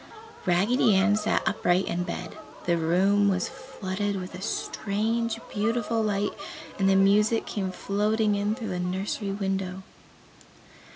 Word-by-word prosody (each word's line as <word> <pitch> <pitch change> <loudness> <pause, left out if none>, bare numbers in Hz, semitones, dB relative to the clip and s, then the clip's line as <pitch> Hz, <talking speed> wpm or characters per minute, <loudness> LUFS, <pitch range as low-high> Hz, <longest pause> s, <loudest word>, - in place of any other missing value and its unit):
Raggedy 200 +5 +3
Ann 200 +2 +4
sat 215 +1 0
upright 190 -3 +2
in 175 - -2
bed. 180 -1 -5 0.3
The 175 - +2
room 190 +5 +3
was 185 -2 0
flooded 205 -7 -4
with 180 0 -7
a 185 - -8
strange, 225 +2 -1
beautiful 230 +1 0
light 205 -1 0 0.5
and 195 0 +3
the 195 - +4
music 210 +3 +4
came 190 -3 -3
floating 210 +3 +1
in 205 +1 0
through 225 -3 -5
the 180 -1 -2
nursery 190 +3 -2
window. 190 -1 -2
200 Hz, 135 wpm, -27 LUFS, 190-215 Hz, 0.5 s, Ann